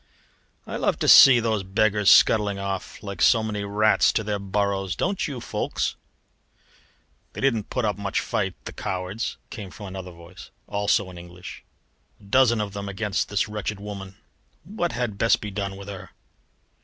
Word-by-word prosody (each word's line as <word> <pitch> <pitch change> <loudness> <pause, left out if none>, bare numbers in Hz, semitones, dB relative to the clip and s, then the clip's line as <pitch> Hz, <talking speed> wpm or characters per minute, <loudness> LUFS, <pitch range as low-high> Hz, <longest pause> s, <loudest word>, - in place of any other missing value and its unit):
"I - - -5
love - - 0
to - - -1
see 130 -3 +9
those 110 -3 0
beggars 105 +2 +2
scuttling 105 -2 +5
off, 100 +1 -5
like 100 -4 -6
so 115 -3 +5
many 105 -2 -3
rats 105 +2 +3
to 110 - 0
their 105 -1 -2
burrows, 100 -1 -1
don't 190 +1 -1
you, 140 -4 -5
Ffoulkes?" - - -2 1.4
"They - - -7
didn't 115 -6 0
put 125 -3 -1
up 105 -1 -1
much 100 -1 -1
fight, - - -2
the - - -7
cowards!" 95 +5 -4
came 100 -3 -7
from 105 - -10
another 95 -1 -7
voice, 85 -1 -13 0.2
also 100 -2 0
in 90 - -10
English. 90 +1 -11 0.6
"A - - -21
dozen 120 +2 +3
of 105 -2 -3
them 100 -1 -5
against 105 +1 -2
this 105 -1 0
wretched 105 -1 -4
woman. 100 -2 -8 0.5
What 175 -1 -3
had 120 -5 -3
best 115 - +3
be 105 - -6
done 100 -1 -4
with 100 0 -10
her?" 100 -2 -8
100 Hz, 170 wpm, -24 LUFS, 95-110 Hz, 1.4 s, see